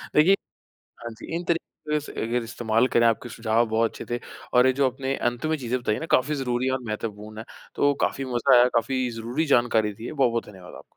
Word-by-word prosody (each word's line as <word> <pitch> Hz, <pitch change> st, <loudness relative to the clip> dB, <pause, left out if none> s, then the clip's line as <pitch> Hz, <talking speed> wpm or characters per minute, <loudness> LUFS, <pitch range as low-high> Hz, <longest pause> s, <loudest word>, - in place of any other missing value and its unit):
देखिए 165 Hz, +6 st, +6 dB, 0.7 s
हाँ 120 Hz, -, -5 dB
जी, 110 Hz, -, -11 dB
इन 175 Hz, -, -2 dB
तरीके 155 Hz, -2 st, -2 dB
से 145 Hz, -, -9 dB
अगर 120 Hz, +1 st, -1 dB
इस्तेमाल 115 Hz, +1 st, +1 dB
करें 115 Hz, -2 st, +3 dB
आपके 115 Hz, +2 st, 0 dB
सुझाव 115 Hz, +1 st, +1 dB
बहुत 115 Hz, +1 st, +2 dB
अच्छे -, -, -9 dB
थे। -, -, -4 dB, 0.3 s
और 125 Hz, +1 st, +6 dB
ये 130 Hz, -, +3 dB
जो 135 Hz, 0 st, +2 dB
आपने 135 Hz, +1 st, -3 dB
अंत 120 Hz, +3 st, -2 dB
में 155 Hz, 0 st, 0 dB
चीज़ें 125 Hz, -2 st, -2 dB
बताई 105 Hz, -3 st, 0 dB
है -, -, -5 dB
ना 160 Hz, -, -3 dB
काफ़ी 145 Hz, +4 st, +3 dB
ज़रूरी 130 Hz, -2 st, -1 dB
और 130 Hz, 0 st, 0 dB
महत्वपूर्ण 105 Hz, 0 st, -5 dB
है। 110 Hz, -, -6 dB, 0.3 s
तो 145 Hz, 0 st, +3 dB
काफ़ी 135 Hz, -, 0 dB
मज़ा 120 Hz, -1 st, +3 dB
आया, 120 Hz, +1 st, +6 dB
काफ़ी 125 Hz, +2 st, +1 dB
ज़रूरी 115 Hz, +7 st, -2 dB
जानकारी 115 Hz, -6 st, +2 dB
दी 110 Hz, +4 st, -10 dB
है। -, -, -5 dB
बहुत-बहुत 120 Hz, -5 st, +1 dB
धन्यवाद 95 Hz, -3 st, -12 dB
आपका। -, -, -11 dB
120 Hz, 225 wpm, -25 LUFS, 115-135 Hz, 0.7 s, देखिए